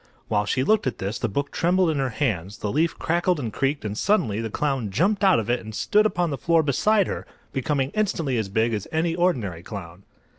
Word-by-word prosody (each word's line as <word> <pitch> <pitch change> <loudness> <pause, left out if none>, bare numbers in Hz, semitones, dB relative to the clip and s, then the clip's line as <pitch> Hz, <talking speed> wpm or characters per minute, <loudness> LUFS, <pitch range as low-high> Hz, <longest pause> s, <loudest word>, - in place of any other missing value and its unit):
While 105 -2 +1
she 130 - +1
looked 215 0 +2
at 130 - -2
this 100 +4 -3
the - - -1
book 140 +7 -2
trembled 180 0 +2
in 150 - -2
her 135 -1 0
hands, 105 - -2
the 105 - -3
leaf 160 +4 +1
crackled 175 0 +1
and 115 -6 -4
creaked 135 -2 -1
and 105 -1 -3
suddenly 115 - +1
the 115 - -3
clown 135 -3 -1
jumped 195 - +1
out 190 -3 +6
of 110 - -4
it 120 +1 +1
and 110 0 -9
stood 210 - +3
upon 175 -5 -1
the 140 - -3
floor 165 -1 +3
beside 200 - +3
her, - - -5 0.3
becoming 135 0 0
instantly 170 -10 0
as 105 -3 -3
big 110 +3 +1
as 105 -2 -3
any 165 +1 +1
ordinary 125 - 0
clown. 90 -2 -8
135 Hz, 225 wpm, -24 LUFS, 110-170 Hz, 0.3 s, out